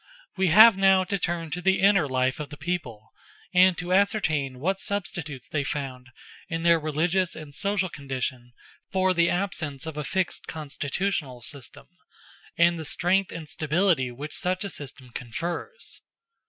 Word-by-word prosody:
We 190 -1 +2
have 215 +5 +8
now 190 -1 +5
to 200 +1 -2
turn 170 -2 -2
to 175 +4 -3
the 190 +1 +3
inner 195 -6 +4
life 130 +2 +1
of 150 -2 -5
the 145 - -9
people, 130 -10 -4 0.4
and 180 -1 +6
to 180 0 -2
ascertain 160 - +1
what 190 +7 0
substitutes 175 - -4
they 145 -2 -1
found 130 -3 -5 0.4
in 165 -1 -3
their 170 -1 +5
religious 165 +4 0
and 150 -2 -9
social 200 +3 0
condition, 130 -5 -5 0.4
for 185 -1 +2
the 170 -1 +3
absence 160 -7 -2
of 160 -2 -6
a 150 - -2
fixed 185 +6 -2
constitutional 145 -2 -3
system, 135 0 -8 0.7
and 170 0 +4
the - - -4
strength 185 +5 +1
and 165 -2 -7
stability 155 -3 +1
which 140 +5 -7
such 185 +1 -1
a 200 - -3
system 130 -4 -8
confers. 170 - -5
165 Hz, 155 wpm, -26 LUFS, 140-185 Hz, 0.7 s, have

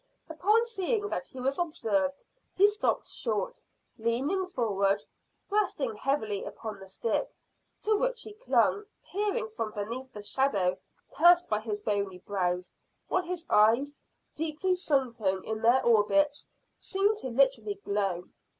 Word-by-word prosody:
Upon 405 +8 +2
seeing 415 -1 -1
that - - -3
he 260 - -10
was 270 +4 -1
observed 290 -4 0 0.3
he 400 +2 +7
stopped 420 +1 0
short, 230 - -2 0.4
leaning 270 - 0
forward 200 - +1 0.5
resting 370 - +1
heavily 220 -5 -1
upon 215 -3 -7
the 195 - -11
stick, 215 +4 -1 0.5
to 430 0 +2
which - - 0
he 430 - -9
clung, 425 -2 +2 0.2
peering 405 - -1
from 220 0 -4
beneath 235 +6 -5
the 210 - -9
shadow 205 -7 +1 0.4
cast 350 0 +6
by 210 - +2
his 215 -2 -4
bony 200 -3 -1
brows, 180 -1 -2 0.4
while 370 - +2
his 355 -1 -5
eyes, 235 +7 +4 0.4
deeply 320 +4 -1
sunken 240 - 0
in 220 0 -4
their 240 +3 +4
orbits, 285 +7 +3 0.3
seemed 400 +2 +1
to 260 - -4
literally 235 -5 +2
glow. 195 -3 -1
260 Hz, 135 wpm, -29 LUFS, -, 0.5 s, he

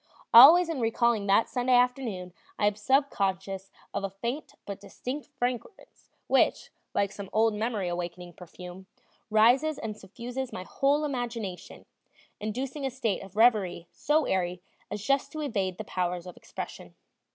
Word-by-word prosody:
Always 320 +9 +10
in 325 -5 -3
recalling 225 -2 +1
that 200 +3 +4
Sunday 250 0 +1
afternoon 245 -8 0 0.2
I 205 - +1
am 205 0 +2
sub 270 +7 +2
conscious 195 0 -2 0.2
of - - -2
a 195 - -1
faint 235 +9 -5
but 200 0 -6
distinct 255 +7 -6
fragrance 250 - -5 0.2
which, - - +2 0.2
like 200 -1 +1
some 200 -1 -8
old 220 0 +3
memory 215 -3 -2
awakening 175 0 -5
perfume, 180 +2 -11 0.4
rises 245 +8 +4
and 215 -2 -5
suffuses 240 +6 -6
my - - -6
whole 285 +9 +1
imagination, 235 -9 -5 0.5
inducing 255 +7 -4
a 270 - 0
state 235 -6 -2
of 195 0 -12
reverie 205 -7 +3
so 300 0 +1
airy 180 -1 -1 0.3
as 205 - -5
just 275 +2 +1
to 310 - -4
evade 195 -10 -2
the - - -5
powers 180 -1 -2
of 180 - -9
expression. - - -8
220 Hz, 150 wpm, -28 LUFS, 190-255 Hz, 0.5 s, Always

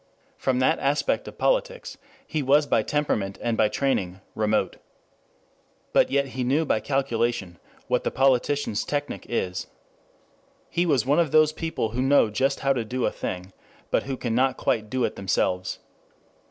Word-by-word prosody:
From 130 -1 0
that 130 - +2
aspect 140 +1 0
of - - -9
politics - - 0 0.3
he 155 - -2
was 145 +3 +4
by 115 - +2
temperament 110 -7 -1
and 120 -1 -1
by 110 - +3
training 100 -7 -1
remote. 110 0 0 1.2
But - - +4
yet 140 0 +1
he 130 0 -3
knew 140 +6 +1
by 110 - +1
calculation 120 - -1 0.3
what - - +1
the - - 0
politician's 135 -2 +1
technic 145 0 -4
is. 90 -6 -2 1.0
He 175 +1 +1
was 135 -7 +2
one 145 +5 +3
of 165 -3 +2
those 155 -1 +5
people 160 -9 -2
who 120 +3 -2
know 135 -4 +4
just 135 +5 0
how 135 0 +3
to 120 -3 -2
do 125 +3 -2
a - - +1
thing, 90 +1 -5 0.4
but - - +3
who 135 -1 -4
can 120 -2 -2
not 130 +2 +2
quite 110 -1 0
do 130 +2 -1
it - - -1
themselves. 90 -1 -1
130 Hz, 165 wpm, -25 LUFS, 110-145 Hz, 1.2 s, those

